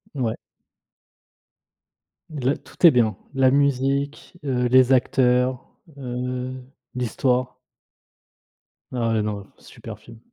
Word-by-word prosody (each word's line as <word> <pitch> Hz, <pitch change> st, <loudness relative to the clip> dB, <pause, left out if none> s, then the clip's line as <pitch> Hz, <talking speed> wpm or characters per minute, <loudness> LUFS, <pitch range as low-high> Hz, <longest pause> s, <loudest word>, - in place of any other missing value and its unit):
Ouais. 120 Hz, -5 st, -1 dB, 2.0 s
La 140 Hz, -2 st, 0 dB
tout -, -, -2 dB
est 165 Hz, -, +8 dB
bien. 110 Hz, -4 st, +2 dB, 0.2 s
La 130 Hz, -1 st, +4 dB
musique, 140 Hz, +3 st, 0 dB
heu, 125 Hz, -3 st, 0 dB
les 130 Hz, +1 st, +5 dB
acteurs, 125 Hz, 0 st, +1 dB, 0.2 s
heu, 125 Hz, 0 st, -4 dB, 0.4 s
l'histoire. 125 Hz, +1 st, -1 dB, 1.3 s
Ah 115 Hz, -3 st, 0 dB
non, 100 Hz, -2 st, -5 dB
super -, -, -11 dB
film! 115 Hz, -1 st, -15 dB
125 Hz, 95 wpm, -23 LUFS, 125-135 Hz, 2.0 s, est